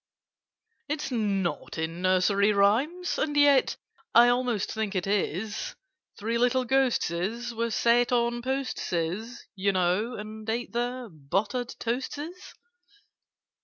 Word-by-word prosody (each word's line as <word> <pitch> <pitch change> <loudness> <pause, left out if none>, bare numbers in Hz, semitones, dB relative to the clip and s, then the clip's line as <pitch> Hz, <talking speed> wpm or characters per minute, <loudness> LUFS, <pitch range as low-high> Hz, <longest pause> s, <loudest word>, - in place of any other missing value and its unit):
"It's 295 -2 -2
not 200 -9 -1
in 165 +2 -3
Nursery 185 +3 +3
Rhymes? 265 - +2
And 295 -1 0
yet 285 -2 +5 0.4
I 240 +1 +8
almost 245 -4 0
think 220 -2 -2
it 185 - 0
is— 205 +1 -2 0.4
'Three 230 +3 -1
little 250 +1 +2
Ghosteses' 235 -3 0
were 230 +1 -1
set 235 +2 +3
'On 240 0 +1
posteses,' 230 -5 -3
you 200 0 +1
know, 185 +6 +1
and 215 +1 -7
ate 235 +2 -2
Their 245 +1 -2
'buttered 205 - -2
toasteses. 290 +9 -4
230 Hz, 115 wpm, -27 LUFS, 200-250 Hz, 0.4 s, I